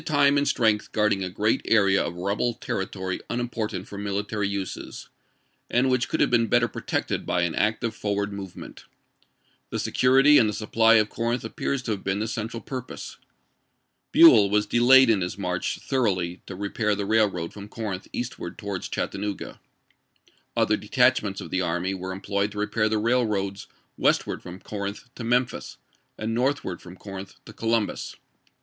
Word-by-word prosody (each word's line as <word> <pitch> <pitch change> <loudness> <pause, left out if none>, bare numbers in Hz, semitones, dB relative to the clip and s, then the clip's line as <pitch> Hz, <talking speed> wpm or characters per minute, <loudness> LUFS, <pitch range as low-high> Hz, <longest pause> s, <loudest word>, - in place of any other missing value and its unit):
XIX. - - -12
time 145 -1 +4
and 145 - 0
strength 110 -2 +1
guarding 105 -2 +2
a 90 - -3
great 105 +4 +1
area 100 -3 +4
of 85 - -4
rebel 100 +6 -1
territory 95 -1 -4
unimportant 115 -5 -3
for 100 - -8
military 100 +1 -2
uses, 100 -2 -5 0.6
and 130 +2 +2
which 125 -1 +1
could - - -1
have - - +3
been 115 -2 +3
better 120 0 +3
protected - - -2
by 90 - 0
an 85 -2 0
active 110 +1 0
for 105 -1 -2
ward 100 0 -2
movement. 95 -2 -9 0.8
The - - -3
security 135 +3 +5
and 110 - +3
the - - -3
supply 115 +2 +3
of 110 -1 +4
Corinth 120 +1 -2
appears 130 +4 -2
to 115 - -3
have 100 -2 -3
been 95 0 0
the 110 +2 -2
central 115 +1 -4
purpose. 130 -2 -7 0.9
Buell 315 - +8
was 105 +1 +2
delayed 125 +4 +6
in 110 -4 +3
his 90 +1 -3
march 90 -2 -2
thoroughly 95 -9 -1
to 95 - -7
rejiair 105 +1 -1
the 100 - -2
railroad 100 -6 +1
from 100 0 -9
Corinth 105 -5 -5
eastward 120 -7 -5
towards 100 -4 -5
Chattanooga. 100 0 -4 1.0
Other 105 - +3
detachments 110 -3 +2
of - - -9
the 95 - +1
army 90 +2 -1
were 95 0 -5
employed 100 +1 -2
to - - -9
repair 105 +1 0
the 110 - 0
raih^oads 105 -4 0 0.3
westward - - +1
from 90 +1 -9
Corinth 100 +4 -6
to 120 - -8
Memphis, 120 +1 -1 0.4
and 110 +1 -3
northward 125 -7 -1
from 90 0 -11
Corinth 95 0 -9
to 105 - -11
Columbus. 115 -1 -1
105 Hz, 170 wpm, -25 LUFS, 100-115 Hz, 1.0 s, Buell